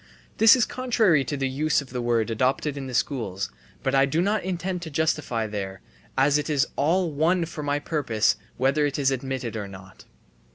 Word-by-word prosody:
This 225 Hz, +1 st, +8 dB
is 245 Hz, -4 st, +2 dB
contrary 225 Hz, -, +2 dB
to 145 Hz, +4 st, -3 dB
the 135 Hz, -1 st, 0 dB
use 150 Hz, +4 st, +1 dB
of 140 Hz, -3 st, -8 dB
the 125 Hz, -1 st, -3 dB
word 120 Hz, -1 st, +1 dB
adopted 130 Hz, +5 st, 0 dB
in 135 Hz, -2 st, -5 dB
the 130 Hz, -, -7 dB
schools; 110 Hz, -9 st, -1 dB, 0.3 s
but 130 Hz, -, 0 dB
I 135 Hz, 0 st, +4 dB
do 155 Hz, +4 st, 0 dB
not 205 Hz, +3 st, +1 dB
intend 180 Hz, 0 st, -3 dB
to 165 Hz, -, -6 dB
justify 155 Hz, -6 st, 0 dB
there, 100 Hz, -3 st, -5 dB, 0.4 s
as 140 Hz, +2 st, +4 dB
it 150 Hz, -, -4 dB
is 145 Hz, -1 st, +2 dB
all 170 Hz, +4 st, +1 dB
one 165 Hz, +4 st, +2 dB
for 160 Hz, -1 st, -7 dB
my 145 Hz, 0 st, 0 dB
purpose 145 Hz, -8 st, +1 dB, 0.2 s
whether 135 Hz, +4 st, +2 dB
it 145 Hz, -, -4 dB
is 135 Hz, -2 st, +2 dB
admitted 130 Hz, -3 st, -3 dB
or 105 Hz, -2 st, -4 dB
not. 95 Hz, -1 st, -13 dB
140 Hz, 200 wpm, -25 LUFS, 125-160 Hz, 0.4 s, This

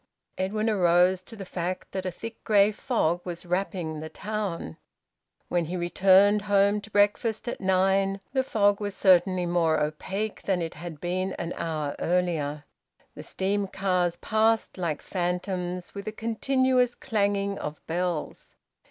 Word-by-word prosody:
Edwin 215 Hz, +4 st, -1 dB
arose 180 Hz, -2 st, +3 dB
to 225 Hz, +5 st, -12 dB
the 200 Hz, -3 st, -7 dB
fact 180 Hz, 0 st, -4 dB
that 190 Hz, -1 st, -3 dB
a -, -, -2 dB
thick 230 Hz, +5 st, -9 dB
grey 205 Hz, -1 st, +4 dB
fog 180 Hz, -7 st, 0 dB
was 175 Hz, -1 st, -6 dB
wrapping 175 Hz, -3 st, -2 dB
the 160 Hz, +1 st, -6 dB
town. 200 Hz, -, -4 dB, 0.7 s
When 175 Hz, -1 st, 0 dB
he 180 Hz, +3 st, -4 dB
returned 190 Hz, +4 st, +4 dB
home 200 Hz, +1 st, +4 dB
to 215 Hz, -, -12 dB
breakfast 210 Hz, +3 st, +1 dB
at 240 Hz, -, -4 dB
nine 195 Hz, +1 st, +2 dB
the 265 Hz, -1 st, +2 dB
fog 205 Hz, -5 st, +2 dB
was 205 Hz, -1 st, -3 dB
certainly 185 Hz, -1 st, +4 dB
more 170 Hz, -2 st, +2 dB
opaque 190 Hz, +8 st, -3 dB
than 190 Hz, -2 st, 0 dB
it 165 Hz, -1 st, -3 dB
had 160 Hz, -1 st, -8 dB
been 185 Hz, +3 st, -2 dB
an 170 Hz, 0 st, -4 dB
hour 155 Hz, -3 st, -3 dB
earlier. 160 Hz, -5 st, 0 dB, 0.5 s
The -, -, -9 dB
steam 200 Hz, +1 st, -1 dB
cars 180 Hz, -3 st, 0 dB
passed 220 Hz, +4 st, +1 dB
like 170 Hz, -5 st, -3 dB
phantoms, 180 Hz, 0 st, -3 dB
with 200 Hz, 0 st, -7 dB
a -, -, -1 dB
continuous 250 Hz, +3 st, +1 dB
clanging 200 Hz, -4 st, 0 dB
of 150 Hz, 0 st, -5 dB
bells. 175 Hz, -1 st, -3 dB
190 Hz, 150 wpm, -27 LUFS, 175-205 Hz, 0.7 s, grey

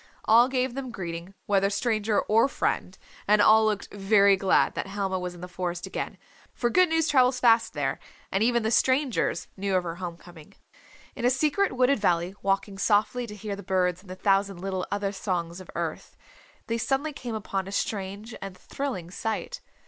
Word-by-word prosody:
All 235 Hz, +3 st, +6 dB
gave 255 Hz, -1 st, 0 dB
them 265 Hz, -1 st, -5 dB
greeting, 175 Hz, -3 st, -6 dB
whether 195 Hz, -1 st, +2 dB
stranger 215 Hz, 0 st, +1 dB
or 225 Hz, +4 st, +3 dB
friend, 190 Hz, -8 st, -2 dB, 0.3 s
and 210 Hz, +1 st, +5 dB
all 220 Hz, +1 st, +6 dB
looked 210 Hz, -2 st, -2 dB
very 200 Hz, 0 st, +4 dB
glad 190 Hz, 0 st, +2 dB
that -, -, -4 dB
Helma 195 Hz, -1 st, -2 dB
was 180 Hz, -1 st, -5 dB
in 175 Hz, -, -12 dB
the 180 Hz, -, -6 dB
forest 180 Hz, -1 st, -4 dB
again, -, -, -5 dB, 0.4 s
for 240 Hz, -1 st, 0 dB
good 365 Hz, +3 st, +4 dB
news 325 Hz, -1 st, +2 dB
travels 255 Hz, -3 st, +3 dB
fast 230 Hz, -2 st, +4 dB
there, 140 Hz, -2 st, -2 dB, 0.3 s
and 195 Hz, -, 0 dB
even 235 Hz, 0 st, +2 dB
the 220 Hz, -, 0 dB
strangers 260 Hz, +1 st, +1 dB
knew 195 Hz, 0 st, -1 dB
of 185 Hz, -, +2 dB
her 170 Hz, -1 st, -5 dB
home 175 Hz, -2 st, -5 dB
coming. 175 Hz, +2 st, -15 dB, 0.6 s
In 240 Hz, -, -6 dB
a 245 Hz, -, +5 dB
secret 305 Hz, +8 st, +1 dB
wooded 255 Hz, +1 st, +3 dB
valley, 175 Hz, -2 st, +1 dB
walking 195 Hz, 0 st, -1 dB
softly 215 Hz, +5 st, +1 dB
to 210 Hz, -, -8 dB
hear 210 Hz, -1 st, -5 dB
the 200 Hz, -, -9 dB
birds 180 Hz, -2 st, 0 dB
and 195 Hz, -, -18 dB
the 185 Hz, -, -6 dB
thousand 195 Hz, 0 st, +1 dB
little 190 Hz, 0 st, -3 dB
other 200 Hz, 0 st, -1 dB
songs 180 Hz, -3 st, -3 dB
of 185 Hz, -, -14 dB
earth, -, -, -4 dB, 0.5 s
they 230 Hz, 0 st, -2 dB
suddenly 280 Hz, +6 st, -1 dB
came 240 Hz, -4 st, -5 dB
upon 195 Hz, -2 st, -3 dB
a -, -, -6 dB
strange 200 Hz, +2 st, -3 dB
and 195 Hz, -2 st, -7 dB
thrilling 185 Hz, -9 st, -5 dB
sight. 225 Hz, -, -4 dB
200 Hz, 190 wpm, -27 LUFS, 185-235 Hz, 0.6 s, All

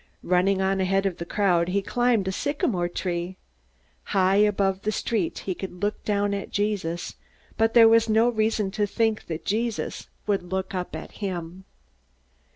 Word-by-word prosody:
Running 190 Hz, +2 st, +2 dB
on 190 Hz, 0 st, +1 dB
ahead 195 Hz, +1 st, +1 dB
of 190 Hz, -3 st, -1 dB
the 170 Hz, -, -6 dB
crowd, 180 Hz, -5 st, +2 dB
he 195 Hz, +2 st, 0 dB
climbed 240 Hz, -3 st, +1 dB
a -, -, +1 dB
sycamore 200 Hz, -8 st, -1 dB
tree. 175 Hz, +1 st, -3 dB, 0.7 s
High 195 Hz, -1 st, +2 dB
above 200 Hz, -2 st, +2 dB
the 215 Hz, -, -1 dB
street, 210 Hz, -5 st, -1 dB
he 190 Hz, -, -1 dB
could 180 Hz, 0 st, -8 dB
look 205 Hz, +1 st, -1 dB
down 205 Hz, -1 st, 0 dB
at 200 Hz, 0 st, -4 dB
Jesus, 200 Hz, -5 st, -2 dB, 0.4 s
but 225 Hz, +1 st, +1 dB
there 230 Hz, -1 st, +9 dB
was 225 Hz, 0 st, +4 dB
no 220 Hz, +2 st, +4 dB
reason 220 Hz, -3 st, 0 dB
to 205 Hz, +1 st, 0 dB
think 220 Hz, +1 st, 0 dB
that 160 Hz, -1 st, -5 dB
Jesus 225 Hz, +2 st, -2 dB, 0.2 s
would 200 Hz, -2 st, +1 dB
look 190 Hz, +3 st, -4 dB
up 180 Hz, -1 st, -4 dB
at -, -, -8 dB
him. 185 Hz, -2 st, -5 dB
195 Hz, 165 wpm, -25 LUFS, 185-215 Hz, 0.7 s, there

